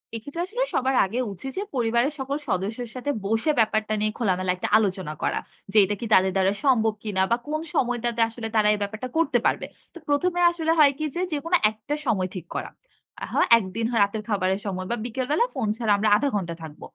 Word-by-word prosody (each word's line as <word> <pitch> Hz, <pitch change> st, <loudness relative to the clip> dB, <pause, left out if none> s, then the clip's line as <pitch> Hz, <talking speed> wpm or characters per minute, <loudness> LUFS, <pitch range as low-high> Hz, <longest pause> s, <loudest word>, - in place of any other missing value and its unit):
এক্ষেত্রে 285 Hz, +9 st, -5 dB
আসলে 485 Hz, +6 st, -2 dB
সবার 260 Hz, 0 st, +1 dB
আগে 220 Hz, +6 st, -5 dB, 0.2 s
উচিত 265 Hz, +9 st, -7 dB
যে -, -, 0 dB
পরিবারের 240 Hz, +4 st, +1 dB
সকল 275 Hz, +2 st, -2 dB
সদস্যের 215 Hz, +6 st, -2 dB
সাথে 285 Hz, +3 st, -2 dB
বসে 225 Hz, +9 st, +1 dB
ব্যাপারটা 215 Hz, 0 st, +1 dB
নিয়ে 215 Hz, 0 st, 0 dB
খোলামেলা 185 Hz, -5 st, 0 dB
একটা 180 Hz, -, -4 dB
আলোচনা 190 Hz, -7 st, -1 dB
করা। -, -, 0 dB, 0.3 s
যে 215 Hz, -, +1 dB
এটা 205 Hz, +2 st, -2 dB
কি 235 Hz, -, -4 dB
তাদের 190 Hz, 0 st, +5 dB
দ্বারা 190 Hz, +1 st, +3 dB
সম্ভব 225 Hz, -5 st, +3 dB
কিনা 200 Hz, -3 st, -1 dB
বা 235 Hz, -, +4 dB
কোন 310 Hz, +1 st, -2 dB
সময়টাতে 240 Hz, -2 st, 0 dB
আসলে 225 Hz, -1 st, -6 dB
তারা 210 Hz, -1 st, +4 dB
এই -, -, -1 dB
ব্যাপারটা 215 Hz, +5 st, -4 dB
করতে 285 Hz, -6 st, +3 dB
পারবে? -, -, +1 dB, 0.3 s
তো -, -, -10 dB
প্রথমে 350 Hz, +5 st, +1 dB
আসলে 325 Hz, -1 st, -1 dB
হয় 285 Hz, -2 st, +7 dB
কী 310 Hz, -, -2 dB
যে, 355 Hz, -, -1 dB
যেকোনো 330 Hz, +5 st, +1 dB
একটা 220 Hz, +7 st, -5 dB
সময় 190 Hz, -6 st, +1 dB
ঠিক 175 Hz, -2 st, -6 dB
করা। -, -, -3 dB, 0.5 s
আহা -, -, -2 dB, 0.2 s
একদিন 225 Hz, +2 st, -3 dB
হয় 230 Hz, -, +1 dB
রাতের 210 Hz, +1 st, -2 dB
খাবারের 190 Hz, -1 st, +1 dB
সময় 185 Hz, -1 st, -3 dB
বা -, -, +1 dB
বিকেলবেলা 265 Hz, -, 0 dB
ফোন 250 Hz, -6 st, -2 dB
ছাড়া 225 Hz, -3 st, 0 dB
আমরা 215 Hz, +1 st, +2 dB
০.৫ 280 Hz, +7 st, +1 dB
ঘন্টা 175 Hz, -4 st, -2 dB
থাকব। 155 Hz, -1 st, -10 dB
225 Hz, 205 wpm, -25 LUFS, 200-270 Hz, 0.5 s, হয়